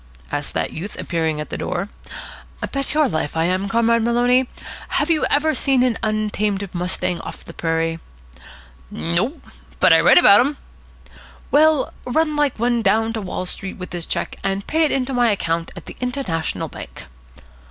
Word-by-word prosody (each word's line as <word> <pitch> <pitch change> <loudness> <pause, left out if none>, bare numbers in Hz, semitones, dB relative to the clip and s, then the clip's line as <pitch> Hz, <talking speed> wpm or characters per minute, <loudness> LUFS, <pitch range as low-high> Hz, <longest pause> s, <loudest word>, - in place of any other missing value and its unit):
asked - - -4
that - - -1
youth, 195 +6 -6
appearing 160 -3 -1
at 150 - -6
the - - -4
door. 180 +2 -2 0.8
"Bet 275 +1 -2
your 305 -2 +4
life 160 - -2
I 160 - +2
am, 185 +3 0
Comrade 230 +1 +3
Maloney. 245 +2 +3 0.4
Have 305 +3 0
you 315 - +2
ever 310 +2 +2
seen 265 -2 +2
an 250 -3 +2
untamed 210 -2 -1
mustang 180 0 -1
of - - -9
the - - -10
prairie?" 165 0 -1 0.9
"Nope. 185 - -2 0.4
But - - +6
I've - - +5
read - - +7
about 205 - +8
dem." 280 +6 +2 0.9
"Well, 310 -1 +4
run 305 +4 0
like 295 -3 +1
one 235 +1 +1
down 225 0 +2
to 220 - -3
Wall 185 -1 -4
Street 190 +1 -4
with 180 - -8
this 175 -2 -4
cheque, - - -2
and 195 0 -2
pay 320 +1 +2
it - - 0
in 260 -2 +1
to 270 - -5
my 245 -2 +3
account 165 -5 -1
at - - -10
the - - -9
International 250 - -2
Bank." - - -10
220 Hz, 175 wpm, -21 LUFS, 180-260 Hz, 0.9 s, about